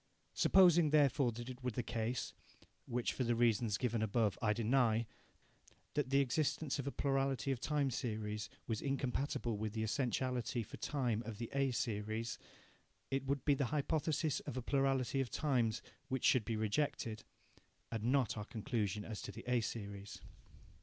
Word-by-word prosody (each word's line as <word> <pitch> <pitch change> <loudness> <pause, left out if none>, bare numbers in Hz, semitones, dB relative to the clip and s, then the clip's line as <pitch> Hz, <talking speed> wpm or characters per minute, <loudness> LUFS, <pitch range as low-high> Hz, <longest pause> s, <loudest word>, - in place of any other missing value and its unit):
Supposing 175 -4 +6
therefore 140 -4 +4
that 120 +2 -7
it 130 0 -8
were 125 - +1
the 125 +1 -2
case 115 +1 -2 0.5
(which, 120 0 -1
for 130 - -1
the 120 -1 +1
reasons 115 -2 +2
given 120 -3 0
above, 110 -1 +2
I 105 - +3
deny) 115 0 +2 0.9
that 145 -3 0
the 140 +1 +4
existence 145 +2 0
of 140 - -3
a - - -1
plurality 135 -1 0
of 130 - -1
time 145 -1 +1
series 105 -4 -3 0.2
was 110 -2 -2
incompatible 135 -3 -1
with 110 -1 -2
the 110 -1 -1
essentiality 125 0 0
for - - -10
time 125 -6 0
of 115 -3 -6
the 115 +1 -5
A 135 -1 +2
series, 110 -1 -2 0.7
it 135 0 0
would 140 -1 -1
be 145 - +5
the 140 0 +1
hypothesis 150 +2 0
of 130 - -6
a - - -1
plurality 135 -1 +1
of 130 - -2
times 125 -8 +1 0.2
which 130 -2 -1
should 125 -5 +4
be 115 - -1
rejected, 110 0 -1 0.7
and 115 -1 -2
not 130 0 +2
our 105 -1 -4
conclusion 105 -2 -2
as 110 -2 -5
to - - -6
the 115 +4 -9
A 125 -1 +3
series. 100 -3 -5
120 Hz, 165 wpm, -37 LUFS, 110-135 Hz, 0.9 s, Supposing